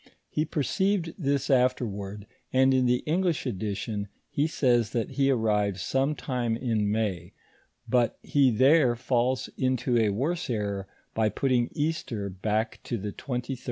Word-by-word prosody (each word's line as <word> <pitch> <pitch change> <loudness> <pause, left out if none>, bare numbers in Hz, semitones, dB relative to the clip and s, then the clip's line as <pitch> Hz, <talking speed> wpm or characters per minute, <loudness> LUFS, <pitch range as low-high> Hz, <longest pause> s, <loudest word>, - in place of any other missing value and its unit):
He 155 - 0
perceived 170 +4 0
this 140 -5 0
afterward, 105 -6 0 0.3
and 130 +1 +4
in 130 -1 +3
the 125 0 +2
English 170 -1 0
edition, 105 -2 -3 0.2
he 145 +2 +1
says, 120 -8 +2
that 115 -3 -1
he 140 -1 +2
arrived 105 -6 +1
some 135 +9 0
time 120 -5 -2
in 110 -4 0
May; 100 -6 -2 0.5
but 120 0 +2
he 140 -2 +3
there 130 +2 +4
falls 125 0 0
into 130 -1 +1
a 110 -2 +3
worse 140 - -1
error 100 -4 -2 0.3
by 110 -1 +2
putting 120 +2 +1
Easter 145 -10 -2
back 110 +4 -1
to 120 - -2
the 105 0 -4
23d 125 +3 -4
of - - -19
March. 135 -2 -3
120 Hz, 155 wpm, -27 LUFS, 105-135 Hz, 0.5 s, and